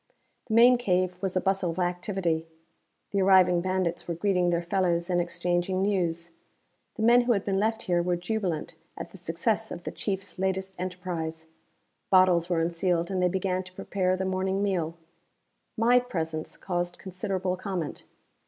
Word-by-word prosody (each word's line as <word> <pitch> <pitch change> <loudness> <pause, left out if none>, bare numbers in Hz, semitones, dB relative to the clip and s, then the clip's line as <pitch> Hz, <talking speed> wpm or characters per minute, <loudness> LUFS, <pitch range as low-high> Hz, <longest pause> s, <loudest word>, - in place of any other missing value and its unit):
The 220 - -1
main 245 +1 +7
cave 185 -5 +1
was 190 -1 -2
a - - +2
bustle 195 -2 +1
of 165 - -4
activity. 175 -2 -1 0.6
The 200 - +1
arriving 185 -2 +5
bandits 185 -2 -1
were 170 - -2
greeting 180 0 +1
their 170 0 0
fellows 175 -1 0
and 175 0 +3
exchanging 175 +2 -1
news. 175 -4 0 0.6
The 220 - -3
men 240 +2 +6
who 240 0 +2
had 200 -2 -1
been 195 -1 +1
left 220 +2 0
here 175 -4 +1
were 175 0 0
jubilant 180 -3 -2 0.2
at - - -7
the 195 - -13
success 205 +7 -1
of 175 - -7
the - - -4
Chief's 195 -2 -4
latest 190 0 -1
enterprise. 175 -3 -4 0.6
Bottles 180 -2 +5
were 170 -2 +1
unsealed 170 +1 0
and 185 -1 0
they 180 - +3
began 185 0 -1
to 185 0 -13
prepare 185 -1 -1
the 190 - -2
morning 190 +1 0
meal. 170 -5 -1 0.8
My 240 +3 +5
presence 160 -10 -4
caused 175 -1 -2
considerable 185 0 -3
comment. 185 -4 -4
185 Hz, 165 wpm, -27 LUFS, 175-195 Hz, 0.8 s, main